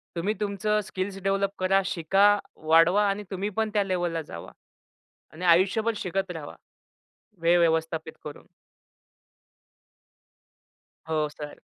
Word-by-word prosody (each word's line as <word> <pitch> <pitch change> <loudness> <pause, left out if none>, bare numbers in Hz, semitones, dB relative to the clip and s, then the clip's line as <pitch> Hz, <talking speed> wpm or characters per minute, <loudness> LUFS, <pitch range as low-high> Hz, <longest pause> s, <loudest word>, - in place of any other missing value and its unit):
तुम्ही 195 +6 0
तुमचं 210 +1 0
skills 190 +1 -4
develop 195 0 +1
करा, 195 +1 +3
शिका, 190 +4 +3 0.3
वाढवा 165 +6 +4
आणि 205 +1 -2
तुम्ही 195 +2 -2
पण 220 -1 +1
त्या 205 -1 +2
लेव्हलला 175 -3 -1
जावा. 85 - -10 0.8
आणि 180 +3 -6
आयुष्यभर 195 +6 +3
शिकत 190 0 -2
रहावा, 160 -4 -8 0.9
वेळ 170 +1 +4
व्यवस्थापित 160 -1 0
करून. 150 - -10 2.6
हो, 155 -1 +1
सर. 150 0 -9
185 Hz, 110 wpm, -26 LUFS, 165-200 Hz, 2.6 s, वाढवा